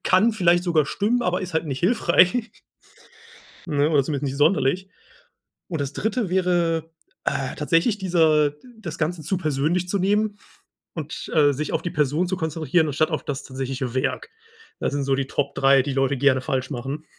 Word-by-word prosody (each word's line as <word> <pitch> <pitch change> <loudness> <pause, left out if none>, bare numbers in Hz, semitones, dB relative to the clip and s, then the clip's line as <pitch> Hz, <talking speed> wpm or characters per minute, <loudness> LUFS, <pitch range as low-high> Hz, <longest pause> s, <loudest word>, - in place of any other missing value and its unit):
kann 210 +5 +3
vielleicht 175 -4 +3
sogar 160 -5 +2
stimmen, 225 +4 0
aber 180 -1 0
ist 180 - -6
halt 160 - 0
nicht 135 -3 -4
hilfreich“ 215 +2 +3 1.2
ne, 145 -3 +1
oder 145 -3 +4
zumindest 145 0 -3
nicht 135 - -5
sonderlich. 160 +3 +2 0.8
Und 165 -4 -3
das 140 0 -3
3. 220 - -1
wäre, 175 -3 0 0.3
äh, 135 -2 -1
tatsächlich 165 +8 +1
dieser 160 -5 +3 0.2
das 220 - -7
Ganze 160 +1 -2
zu 185 +5 -1
persönlich 155 +3 -1
zu 200 +2 0
nehmen 205 +2 +1 0.6
und, 155 -2 -6
äh, 145 -2 +5
sich 150 +2 -4
auf - - -1
die 175 - -3
Person 150 +4 0
zu 185 - -1
konzentrieren, 160 -1 0
anstatt 155 +3 0
auf 155 - -3
das 140 -1 -4
tatsächliche 130 -1 -4
Werk. 130 - -2 0.5
Das - - -2
sind 140 -1 -1
so 135 0 +1
die 135 0 -1
Top 140 +1 -2
3, 135 -1 +4
die 135 0 -3
Leute 135 0 +1
gerne 130 0 +3
falsch 130 +2 -2
machen. 135 +4 -5
155 Hz, 180 wpm, -23 LUFS, 140-180 Hz, 1.2 s, äh